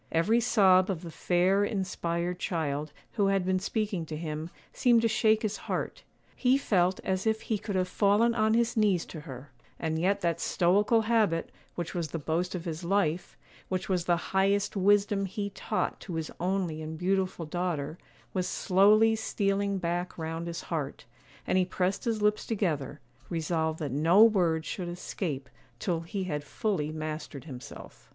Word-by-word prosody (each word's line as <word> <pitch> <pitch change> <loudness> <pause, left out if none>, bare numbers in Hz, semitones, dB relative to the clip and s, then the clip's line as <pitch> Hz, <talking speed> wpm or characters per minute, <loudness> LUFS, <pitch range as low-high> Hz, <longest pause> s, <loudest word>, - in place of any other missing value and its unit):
Every 175 +9 +3
sob 190 -5 +4
of 185 -3 -2
the 170 - -7
fair, 185 +4 +2
inspired 180 -3 -2
child 155 -4 -2 0.2
who 205 -3 +1
had 195 -2 +1
been 185 0 +1
speaking 205 -2 -2
to 155 - -5
him 155 0 -4 0.2
seemed 235 -2 +4
to - - +5
shake 220 0 +3
his 215 -1 -1
heart; - - -2 0.3
he 255 +1 +3
felt 185 -8 +2
as 190 +2 -1
if 220 0 +1
he 215 -3 -2
could 200 -1 -4
have 185 -1 +1
fallen 210 +5 +3
on 220 -1 +2
his 235 0 +1
knees 205 -6 +2
to 155 - -8
her; 140 -2 -10 0.3
and 160 -1 -2
yet 190 +4 +1
that 170 -1 0
stoical 205 +7 +3
habit, 215 -7 +1 0.2
which 175 -2 -4
was 170 -3 -2
the 165 - -4
boast 165 +4 -1
of 175 -1 -5
his 165 0 -4
life, 180 -2 0 0.3
which 185 +1 -2
was 180 -3 0
the 175 -1 +3 0.2
highest 200 +2 +2
wisdom 200 0 +3
he 200 +2 -4
taught 210 - -2
to 180 - -7
his 160 -1 -3
only 180 -3 -1
and 160 +1 -6
beautiful 185 -1 0
daughter, 165 -2 -3 0.3
was 185 -2 0
slowly 210 +4 +4
stealing 200 -2 0
back 175 0 -2
round 165 +1 -4
his 170 -1 -4
heart, 150 -5 -4 0.4
and 185 - +2
he - - +4
pressed 185 +3 -1
his 220 -3 0
lips 210 0 +1
together, 170 - -1 0.3
resolved 160 -1 -1
that 150 -4 -4
no 165 - +5
word 175 -8 +3
should 180 -3 -4
escape 165 -5 -4 0.3
till 175 -4 -1
he 180 +4 -4
had 150 -5 -3
fully 155 -2 -2
mastered 155 -3 -5
himself. 130 -6 -11
185 Hz, 175 wpm, -29 LUFS, 165-205 Hz, 0.4 s, to